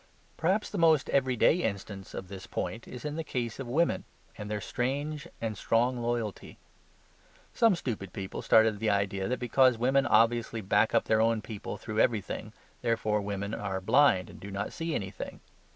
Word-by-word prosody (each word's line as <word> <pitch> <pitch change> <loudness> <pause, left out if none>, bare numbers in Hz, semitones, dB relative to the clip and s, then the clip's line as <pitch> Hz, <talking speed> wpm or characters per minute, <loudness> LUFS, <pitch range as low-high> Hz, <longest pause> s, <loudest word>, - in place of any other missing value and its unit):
Perhaps 190 +6 0
the 205 - -3
most 160 -4 +4
everyday 130 +3 +3
instance 100 - -4
of 95 - -6
this 95 0 -9
point 115 +1 -4
is 125 - -9
in 150 +1 -3
the 165 - -2
case 120 -5 -3
of 135 - -5
women; 160 +8 +1 0.3
and 105 0 -7
their 105 -1 -2
strange 140 +7 -3
and 110 -2 -3
strong 120 +5 +1
loyalty. 120 -3 -3 1.0
Some 225 -4 +4
stupid 110 - -4
people 95 0 -5
started 110 -2 +4
the 110 0 +1
idea 100 -1 0
that 125 - -1
because 125 0 +3
women 135 +4 +2
obviously 115 0 +3
back 105 +2 +2
up - - +4
their 110 0 +3
own 115 -1 +2
people 110 -3 -6
through 110 -1 -4
everything, 110 -5 0 0.3
therefore 110 -2 +1
women 100 +1 -4
are 95 -3 -3
blind 95 -2 +4
and - - -13
do 100 - -8
not 100 +1 -4
see 165 -2 -3
anything. 95 -2 -5
115 Hz, 175 wpm, -29 LUFS, 100-130 Hz, 1.0 s, most